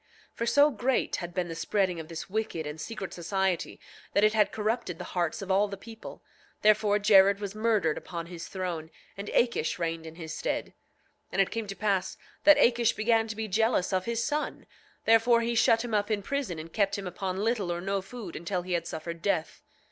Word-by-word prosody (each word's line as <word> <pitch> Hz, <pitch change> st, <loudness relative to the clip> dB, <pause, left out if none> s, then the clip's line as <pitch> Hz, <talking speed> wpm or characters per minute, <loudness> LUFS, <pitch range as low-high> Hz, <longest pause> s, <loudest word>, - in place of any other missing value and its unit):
9:6 -, -, -44 dB
For 230 Hz, -, -1 dB
so 290 Hz, +4 st, +5 dB
great 255 Hz, +1 st, 0 dB
had 175 Hz, -1 st, -5 dB
been 180 Hz, 0 st, -2 dB
the 165 Hz, -, -5 dB
spreading 180 Hz, +1 st, 0 dB
of 160 Hz, -, -7 dB
this 165 Hz, -1 st, -6 dB
wicked 200 Hz, -5 st, -2 dB
and 150 Hz, +1 st, -6 dB
secret 195 Hz, +2 st, -6 dB
society 190 Hz, +1 st, -1 dB, 0.3 s
that 200 Hz, -, +3 dB
it 215 Hz, 0 st, +5 dB
had 215 Hz, -2 st, +3 dB
corrupted 215 Hz, -5 st, -2 dB
the 180 Hz, -, -6 dB
hearts 175 Hz, +1 st, -1 dB
of 195 Hz, -, -3 dB
all 200 Hz, +2 st, +4 dB
the 200 Hz, -1 st, -6 dB
people; 225 Hz, +3 st, -11 dB, 0.4 s
therefore 210 Hz, -1 st, +4 dB
Jared 200 Hz, -1 st, +6 dB
was 200 Hz, -1 st, -4 dB
murdered 215 Hz, -7 st, +1 dB
upon 170 Hz, -2 st, -6 dB
his 170 Hz, -1 st, -8 dB
throne, 175 Hz, -4 st, -4 dB, 0.3 s
and 200 Hz, +1 st, -7 dB
Akish 235 Hz, -10 st, +1 dB
reigned 165 Hz, -1 st, -3 dB
in 160 Hz, -, -10 dB
his 160 Hz, -2 st, -7 dB
stead. -, -, -2 dB
9:7 -, -, -28 dB, 0.6 s
And 195 Hz, -, +3 dB
it -, -, -7 dB
came 225 Hz, -2 st, -3 dB
to 195 Hz, -, -5 dB
pass 200 Hz, -3 st, 0 dB, 0.3 s
that 300 Hz, 0 st, +9 dB
Akish 235 Hz, -1 st, +4 dB
began 225 Hz, 0 st, +2 dB
to 215 Hz, -, -5 dB
be 220 Hz, 0 st, -3 dB
jealous 215 Hz, -2 st, +1 dB
of 185 Hz, -1 st, +1 dB
his 235 Hz, 0 st, -1 dB
son, 300 Hz, +2 st, -2 dB, 0.4 s
therefore 225 Hz, +1 st, +5 dB
he 235 Hz, +1 st, 0 dB
shut 225 Hz, 0 st, +4 dB
him 235 Hz, -, -5 dB
up 205 Hz, 0 st, +1 dB
in 210 Hz, -2 st, 0 dB
prison, 275 Hz, -, -2 dB
and 160 Hz, +1 st, -8 dB
kept 200 Hz, -2 st, +1 dB
him 200 Hz, -, -5 dB
upon 185 Hz, +1 st, -3 dB
little 220 Hz, -6 st, 0 dB
or 170 Hz, -, -2 dB
no 195 Hz, +2 st, -1 dB
food 200 Hz, -2 st, -8 dB
until 175 Hz, +2 st, -3 dB
he 180 Hz, 0 st, -3 dB
had 170 Hz, -1 st, -1 dB
suffered 170 Hz, +1 st, -6 dB
death. 170 Hz, -5 st, -1 dB
200 Hz, 215 wpm, -28 LUFS, 175-225 Hz, 0.6 s, that